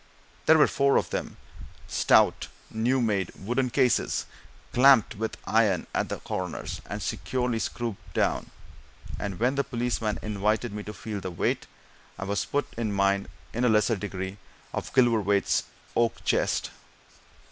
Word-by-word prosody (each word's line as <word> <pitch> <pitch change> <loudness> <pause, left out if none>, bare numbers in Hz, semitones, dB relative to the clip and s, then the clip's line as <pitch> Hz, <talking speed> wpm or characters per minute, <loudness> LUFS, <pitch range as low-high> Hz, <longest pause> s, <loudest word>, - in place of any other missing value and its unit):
There 160 - +8
were 150 - +7
four 140 0 +3
of - - -1
them - - -4 0.5
stout, - - +3 0.2
new 120 +4 +1
made 100 -6 0
wooden 125 +6 -1
cases, 125 -1 +2 0.5
clamped 130 -3 +6
with 110 +1 -4
iron 105 -5 +2
at - - 0
the - - -3
corners, 90 -2 -4
and - - -4
securely 125 -3 -1
screwed 115 -3 -3 0.2
down; - - +1 0.7
and 100 -3 -4
when 125 +3 +2
the 140 0 +1
policemen 120 -4 -1
invited 105 +2 0
me 105 - -4
to 105 - -6
feel 105 -2 -5
the 95 - -5
weight, 85 - -1 0.5
I 100 - -5
was 100 +1 -1
put 145 - 0
in 115 -3 -1
mind, 100 0 +1 0.2
in 120 - -1
a 125 - +4
lesser 110 +1 +3
degree, 95 -1 -5 0.4
of - - -4
Gilverthwaite's 110 -6 +3 0.3
oak 115 -1 +1
chest. - - +1
110 Hz, 145 wpm, -27 LUFS, 100-125 Hz, 0.7 s, There